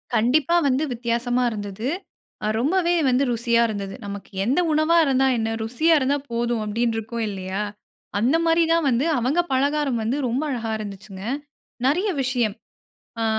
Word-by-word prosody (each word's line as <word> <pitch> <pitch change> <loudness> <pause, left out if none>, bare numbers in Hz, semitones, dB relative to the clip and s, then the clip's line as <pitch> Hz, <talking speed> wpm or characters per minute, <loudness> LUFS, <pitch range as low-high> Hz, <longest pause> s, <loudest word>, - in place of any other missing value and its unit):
கண்டிப்பா 285 +9 +3
வந்து 265 +3 +2
வித்தியாசமா 240 +1 0
இருந்தது. 205 +1 -5 0.6
அ - - +1
ரொம்பவே 345 +6 +2 0.2
வந்து 255 +2 +3
ருசியா 235 0 +2
இருந்தது. 200 -2 -4
"நமக்கு 200 0 -7
எந்த 270 +9 +2
உணவா 310 +2 +3
இருந்தா 265 -1 +3
என்ன? 225 0 -1
ருசியா 255 +9 +2
இருந்தா 280 +2 +1
போதும்." 235 -1 0
அப்படீன்னு 225 +2 0
இருக்கும் 225 +1 -3
இல்லையா? 190 0 -4 0.6
அந்த 255 +8 +3
மாரி 330 0 +4
தான் 330 -3 +2
வந்து 250 +5 +1
அவங்க 270 +9 +1
பலகாரம் 280 -2 +1
வந்து 235 +6 0
ரொம்ப 250 +6 -1
அழகா 230 -4 -2
இருந்துச்சுங்க. 195 -2 -8 0.6
நெறைய 360 +10 +2
விஷயம். 245 -5 0 0.7
ஆ - - +1
240 Hz, 150 wpm, -23 LUFS, 220-285 Hz, 0.7 s, மாரி